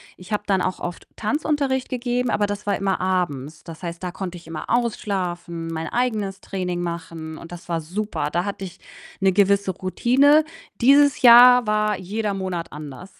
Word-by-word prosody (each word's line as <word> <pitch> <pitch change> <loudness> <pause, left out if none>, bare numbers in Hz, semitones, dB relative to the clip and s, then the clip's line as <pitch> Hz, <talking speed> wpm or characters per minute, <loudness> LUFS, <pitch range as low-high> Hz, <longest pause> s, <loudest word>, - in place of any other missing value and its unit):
Ich 185 +4 -14
habe 210 - -1
dann 195 -2 +2
auch 185 - -2
oft 175 -1 -6
Tanzunterricht 275 +1 -1
gegeben, 245 0 -1
aber 205 - +1
das 205 0 -5
war 205 - 0
immer 195 -1 -1
abends. 160 -6 -2
Das 165 +1 -10
heißt, 170 +1 -5
da 180 - -4
konnte 180 -1 -6
ich 170 - -15
immer 165 -1 -7
ausschlafen, 180 -8 -2
mein 160 0 -4
eigenes 215 -6 -1
Training 180 -2 -3
machen 165 -2 -6
und 170 - -11
das 175 0 -10
war 165 -1 -1
super. 180 -2 -3
Da 175 +3 0
hatte 200 -1 -5
ich 180 0 -11 0.4
'ne 190 -1 +3
gewisse 200 -1 +3
Routine. 260 - +3 0.4
Dieses 280 +3 +5
Jahr 245 -1 +8
war 215 -1 +1
jeder 205 +2 -3
Monat 185 -3 -4
anders. 150 +5 -10
190 Hz, 175 wpm, -22 LUFS, 175-220 Hz, 0.4 s, Jahr